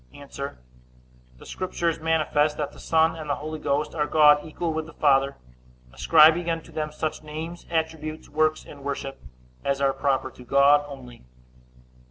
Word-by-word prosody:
A. 140 Hz, 0 st, -12 dB, 1.1 s
The -, -, -15 dB
Scriptures 170 Hz, -3 st, -2 dB
manifest 155 Hz, -2 st, +1 dB
that 145 Hz, -2 st, -3 dB
the -, -, -16 dB
Son 160 Hz, 0 st, +2 dB
and 155 Hz, -2 st, -8 dB
the 145 Hz, -, +1 dB
Holy 155 Hz, +1 st, -6 dB
Ghost 145 Hz, +1 st, -1 dB
are 150 Hz, -2 st, -1 dB
God 150 Hz, -1 st, +5 dB
equal 160 Hz, +1 st, -3 dB
with 160 Hz, 0 st, -3 dB
the 165 Hz, -, -13 dB
Father, 140 Hz, -1 st, +2 dB, 0.6 s
ascribing 165 Hz, +3 st, +5 dB
unto 165 Hz, -1 st, -4 dB
them 155 Hz, -1 st, -3 dB
such 155 Hz, +1 st, -4 dB
names, 160 Hz, +3 st, -7 dB
attributes, 160 Hz, -1 st, -3 dB
works, 155 Hz, +1 st, 0 dB
and 140 Hz, -1 st, -12 dB
worship, 135 Hz, -1 st, -5 dB, 0.4 s
as 140 Hz, 0 st, 0 dB
are 135 Hz, -1 st, +2 dB
proper 135 Hz, -1 st, -1 dB
to 125 Hz, -, -14 dB
God 140 Hz, +3 st, +4 dB
only. 125 Hz, -, -11 dB
150 Hz, 160 wpm, -25 LUFS, 140-160 Hz, 1.1 s, God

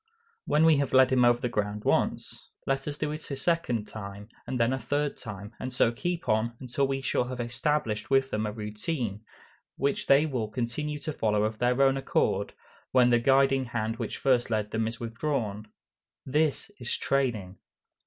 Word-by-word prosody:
When 155 Hz, +2 st, +4 dB
we 160 Hz, -2 st, +6 dB
have 140 Hz, -1 st, -1 dB
led 130 Hz, 0 st, +6 dB
them 130 Hz, -1 st, +3 dB
over 120 Hz, 0 st, +5 dB
the 125 Hz, -, -1 dB
ground 105 Hz, -2 st, -2 dB
once, -, -, 0 dB, 0.2 s
let 135 Hz, +1 st, -1 dB
us 145 Hz, 0 st, -3 dB
do 150 Hz, -1 st, -2 dB
it 155 Hz, +1 st, -6 dB
a 140 Hz, -, -2 dB
second 135 Hz, -7 st, 0 dB
time, 100 Hz, 0 st, -8 dB, 0.2 s
and 130 Hz, 0 st, -2 dB
then 115 Hz, +2 st, +3 dB
a 130 Hz, -, -1 dB
third 145 Hz, +4 st, -1 dB
time, 105 Hz, 0 st, -8 dB
and 130 Hz, -, -4 dB
so 125 Hz, -2 st, +3 dB
keep 170 Hz, +8 st, -3 dB
on, 110 Hz, +2 st, +1 dB
until 135 Hz, +2 st, -1 dB
we 135 Hz, 0 st, -2 dB
shall 130 Hz, -, 0 dB
have 125 Hz, 0 st, -6 dB
established 120 Hz, -2 st, -1 dB
with 135 Hz, 0 st, +3 dB
them 105 Hz, 0 st, -1 dB
a -, -, -3 dB
routine, 105 Hz, +1 st, -4 dB, 0.5 s
which 140 Hz, +1 st, -1 dB
they 140 Hz, +3 st, +6 dB
will 125 Hz, -8 st, -2 dB
continue 125 Hz, +7 st, -3 dB
to 150 Hz, +1 st, -4 dB
follow 105 Hz, -5 st, +1 dB
of 110 Hz, 0 st, -2 dB
their 125 Hz, +1 st, +2 dB
own 135 Hz, 0 st, +4 dB
accord, 135 Hz, -, 0 dB, 0.4 s
when 125 Hz, -1 st, +5 dB
the 120 Hz, -, +5 dB
guiding 135 Hz, +1 st, +3 dB
hand 115 Hz, -1 st, -2 dB
which -, -, -4 dB
first 125 Hz, -3 st, +2 dB
led 110 Hz, -2 st, -1 dB
them 110 Hz, 0 st, 0 dB
is 115 Hz, -, -5 dB
withdrawn. 115 Hz, -3 st, -3 dB, 0.6 s
_This 150 Hz, +6 st, +1 dB
is 120 Hz, -, -2 dB
training. 115 Hz, -9 st, -1 dB
125 Hz, 190 wpm, -28 LUFS, 110-135 Hz, 0.6 s, we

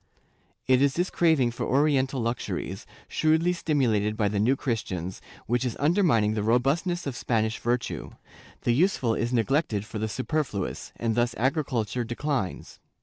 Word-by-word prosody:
It 130 Hz, 0 st, +4 dB
is 140 Hz, -1 st, +3 dB
this 175 Hz, +2 st, 0 dB
craving 160 Hz, -8 st, +3 dB
for 120 Hz, -, -5 dB
oriental 135 Hz, -1 st, +2 dB
luxuries, 115 Hz, +1 st, -3 dB, 0.2 s
shrewdly 160 Hz, +3 st, +2 dB
stimulated 120 Hz, -11 st, +1 dB
by 105 Hz, -2 st, +2 dB
the 100 Hz, 0 st, -1 dB
New 120 Hz, +6 st, +3 dB
Christians, 95 Hz, -, -3 dB, 0.2 s
which 120 Hz, +2 st, 0 dB
is 125 Hz, -4 st, -2 dB
undermining 145 Hz, -, +3 dB
the 110 Hz, -, -1 dB
robustness 140 Hz, -, +1 dB
of 140 Hz, -3 st, -3 dB
Spanish 110 Hz, -2 st, 0 dB
virtue; 120 Hz, +1 st, -2 dB, 0.5 s
the 120 Hz, -, +2 dB
useful 135 Hz, -6 st, +2 dB
is 120 Hz, +2 st, -1 dB
neglec 135 Hz, +6 st, +2 dB
ted 105 Hz, -2 st, -3 dB
for 110 Hz, 0 st, -6 dB
the 110 Hz, +1 st, -2 dB
superfluous, 130 Hz, -, -3 dB
and 115 Hz, -1 st, -1 dB
thus 120 Hz, +1 st, +1 dB
agriculture 125 Hz, -3 st, 0 dB
declines. 120 Hz, -3 st, -3 dB
125 Hz, 150 wpm, -26 LUFS, 110-145 Hz, 0.5 s, It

